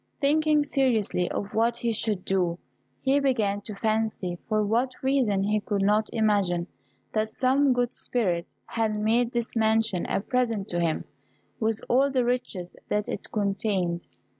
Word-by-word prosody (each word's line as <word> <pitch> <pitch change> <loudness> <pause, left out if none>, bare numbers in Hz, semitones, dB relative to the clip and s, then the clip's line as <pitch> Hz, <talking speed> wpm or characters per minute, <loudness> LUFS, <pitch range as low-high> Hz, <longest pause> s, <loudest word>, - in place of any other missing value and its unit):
Thinking 300 +1 +3
seriously 235 -10 +1
of 205 - -4
what 230 +2 +2
he 235 -1 -1
should 210 -3 -1
do, 180 -3 +1 0.4
he 275 +2 +3
began 220 -8 +1
to 210 0 -7
fancy, 215 -5 -1
for 215 -1 +2
what 240 +5 +1
reason 250 -8 +2
he 210 +1 +1
could 205 -1 -1
not 210 +2 +2
imagine, 200 -6 +1 0.5
that 215 0 0
some 265 +4 +2
good 245 -1 +1
spirit 180 -9 -2
had 220 -2 -1
made 230 +3 +2
this 235 -1 -3
mansion 220 -4 +2
a - - +1
present 225 -2 -1
to 175 - -1
him, 165 -2 0 0.6
with 220 -1 0
all 270 +3 +4
the 255 -3 +1
riches 240 -8 -2
that 210 0 0
it - - -5
contained. 195 -4 -1
220 Hz, 155 wpm, -26 LUFS, 200-245 Hz, 0.6 s, all